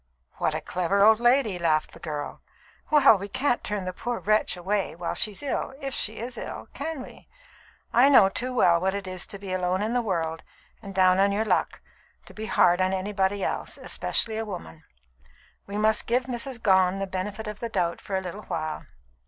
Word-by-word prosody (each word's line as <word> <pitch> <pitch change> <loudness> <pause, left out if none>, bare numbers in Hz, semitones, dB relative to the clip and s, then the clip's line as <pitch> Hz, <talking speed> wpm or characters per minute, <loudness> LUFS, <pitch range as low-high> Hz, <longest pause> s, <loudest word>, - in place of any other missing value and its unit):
"What - - 0
a - - -2
clever 190 +3 +1
old 220 0 +6
lady!" 240 -6 +3
laughed 155 -2 +1
the - - -14
girl. 150 -3 -5 0.5
"Well, 275 -9 +6
we 200 - -5
can't 245 +3 0
turn 205 -3 -3
the 185 - -3
poor 240 +5 -3
wretch 215 -2 +1
away 195 0 -1
while 170 0 -3
she's 210 +4 -2
ill, 270 -1 -2
if 275 -2 -5
she 220 -3 0
is 240 +2 -6
ill, - - -7
can 295 -2 -4
we? - - -14 0.7
I 255 +4 +6
know 260 -8 +7
too 250 +6 -3
well 175 -9 +4
what 190 +1 0
it 200 -1 -4
is 185 0 -4
to 200 - -6
be 195 -1 -6
alone 185 +1 0
in 220 +2 -1
the 245 - +2
world 165 -6 -2 0.4
and 195 -3 -9
down 185 0 +4
on 200 +1 +4
your 210 +2 0
luck, - - 0 0.4
to - - -14
be 220 0 -6
hard 175 +1 +4
on 185 0 +2
anybody 195 0 -1
else, - - -3
especially 220 -1 -1
a 225 - -1
woman. 175 - -8 0.8
We 200 +1 -4
must 215 0 +2
give 245 +2 +2
Mrs. 245 0 -5
Gone 190 -2 +4
the 195 - -2
benefit 195 +3 -4
of 210 0 -6
the 235 - -4
doubt 175 -5 -1
for 195 - -4
a - - -2
little 190 +3 -7
while. 155 -1 -4
200 Hz, 205 wpm, -26 LUFS, 185-225 Hz, 0.8 s, know